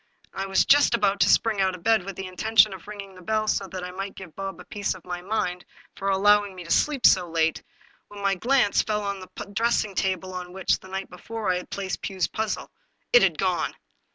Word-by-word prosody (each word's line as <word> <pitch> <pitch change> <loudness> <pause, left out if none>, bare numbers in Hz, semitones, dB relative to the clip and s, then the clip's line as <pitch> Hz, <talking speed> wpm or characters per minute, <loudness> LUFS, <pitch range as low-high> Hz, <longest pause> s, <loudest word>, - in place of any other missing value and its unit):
I 195 0 -3
was 195 - +3
just 285 -4 +5
about 200 -3 +1
to - - +4
springy 220 -3 +3
out 190 -1 +1
of 175 - -13
bed 220 -2 +3
with 195 -1 -6
the 190 - -5
intention 215 +3 +3
of 190 0 -11
ringing 200 -2 -8
the 185 - -14
bell 215 +4 -1
so 195 -2 0
that 185 0 -6
I 180 - -5
might 195 +1 -6
give 180 -5 -11
Bob 195 0 -5
a - - -9
piece 205 -2 -2
of 185 - -14
my 180 -1 -5
mind 180 -2 -2 0.3
for 195 - -2
allowing 205 0 +3
me 180 - -8
to 170 - -8
sleep 290 - +2
so 180 -3 +5
late, 165 -1 +1 0.5
when 205 - -11
my 200 -1 +1
glance 240 +2 +2
fell 210 -1 -2
on 200 -1 -3
the 185 - -11 0.2
dressing 225 -1 +1
table 185 -1 -1
on 180 -1 -6
which, 190 0 +1
the - - -14
night 190 +1 -5
before, 215 +4 -3
I 180 - +1
had 180 - -8
placed 195 -1 -4
Pugh's 190 -3 -1
puzzle. 220 -1 -3 0.4
It - - +8
had - - +3
gone! - - 0
195 Hz, 235 wpm, -25 LUFS, 185-210 Hz, 0.5 s, It